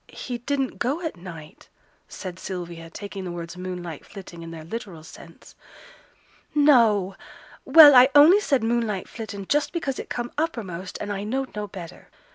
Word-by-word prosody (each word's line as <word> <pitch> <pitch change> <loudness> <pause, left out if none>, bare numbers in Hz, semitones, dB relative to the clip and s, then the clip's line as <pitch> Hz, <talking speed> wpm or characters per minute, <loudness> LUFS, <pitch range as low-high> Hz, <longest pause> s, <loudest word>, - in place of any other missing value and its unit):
'He 245 -2 -6
didn't 270 +1 -2
go 275 +8 -1
at 320 - -3
night,' 170 -4 -12 0.4
said 185 -1 -8
Sylvia, 170 -3 -7
taking 200 +2 -7
the 180 - -5
words 170 0 -7
'moonlight 180 -3 -6
flitting' 180 -4 -11
in 165 - -8
their 165 -1 -9
literal 175 -3 -7
sense. 165 +1 -14 1.0
'No! 230 -10 +4 0.5
Well, 295 +1 +9
I 255 +1 +8
only 315 +8 +8
said 275 - 0
"moonlight 225 -4 -1
flittin'" 205 -3 -7
just 295 0 +1
because 280 -6 -3
it - - -7
come 240 0 -4
uppermost 195 - -4
and 205 0 -4
I 200 0 -4
knowed 260 +4 -3
no 210 0 -4
better. 180 -4 -11
205 Hz, 160 wpm, -24 LUFS, 180-260 Hz, 1.0 s, Well